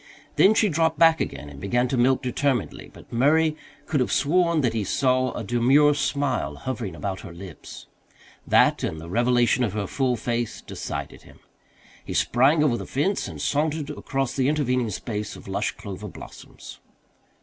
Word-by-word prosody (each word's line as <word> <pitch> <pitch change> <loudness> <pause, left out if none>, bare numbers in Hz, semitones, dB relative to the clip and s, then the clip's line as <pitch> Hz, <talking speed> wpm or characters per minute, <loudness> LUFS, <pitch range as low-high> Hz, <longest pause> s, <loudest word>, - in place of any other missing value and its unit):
Then 210 +3 +5
she 215 - +4
dropped 160 -2 +1
back 165 0 +5
again 75 - -4
and 70 -1 -11
began 120 +6 0
to 135 - 0
milk 130 +2 +2
determinedly, 130 -1 -1
but - - -15
Murray 155 +6 +3 0.3
could 150 - 0
have 125 - 0
sworn 170 +2 +2
that 120 -4 +1
he 110 -2 -1
saw 130 +4 +1
a 120 - -5
demure 130 +7 +4
smile 140 - -1
hovering 110 - -5
about 95 +5 -4
her 85 - -10
lips. 90 +2 -11 0.6
That, - - +4
and 80 - -3
the 85 +2 -9
revelation 120 +2 +2
of 105 -5 -1
her 105 -2 -2
full 130 +3 0
face, 120 0 -3
decided - - -6
him. - - -18 0.6
He - - -6
sprang 145 +5 +3
over 130 -6 +2
the - - -7
fence 185 +9 -1
and - - -8
sauntered 150 0 -1
across 135 -1 -3
the 130 -1 +1
intervening 125 -5 0
space 105 +1 -5
of - - -13
lush - - -1
clover - - -8
blossoms. - - -12
130 Hz, 170 wpm, -24 LUFS, 115-150 Hz, 0.6 s, Then